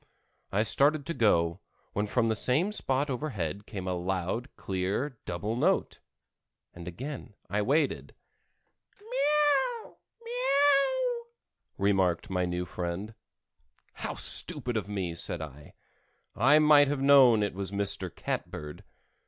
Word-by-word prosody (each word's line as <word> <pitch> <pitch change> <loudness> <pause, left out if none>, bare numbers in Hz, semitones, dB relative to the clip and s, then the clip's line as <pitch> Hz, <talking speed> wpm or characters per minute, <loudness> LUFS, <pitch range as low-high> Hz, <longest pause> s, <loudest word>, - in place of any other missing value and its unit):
I 105 +2 +2
started 145 +5 +2
to 170 - -3
go, 85 - +2 0.3
when 105 +1 -1
from 115 +2 +1
the 110 - +1
same 140 - +1
spot 140 -8 0
overhead 105 - -4
came 95 -4 -6
a 90 - 0
loud, 95 +7 -3
clear 100 +8 -3
double 100 +6 -3
note, 120 - 0 0.7
and 85 -1 -10
again 125 - -7 0.2
I 105 +1 +1
waited. 140 +6 0 0.8
"Meow! 300 - 0 0.3
meow!" 470 - +1 0.5
remarked 95 -3 +1
my 90 -1 0
new 90 0 -3
friend. 90 +5 -5 0.8
"How - - -5
stupid 125 -1 +3
of 105 -2 -2
me!" 95 -4 -3
said 85 +1 -4
I. 75 -2 -10 0.6
"I 135 +8 +5
might 150 -2 +6
have 140 -1 -2
known 130 -6 +6
it 100 - -2
was 95 0 -4
Mr. 100 -2 -1
Catbird." 75 -1 -6
110 Hz, 125 wpm, -29 LUFS, 95-150 Hz, 0.8 s, might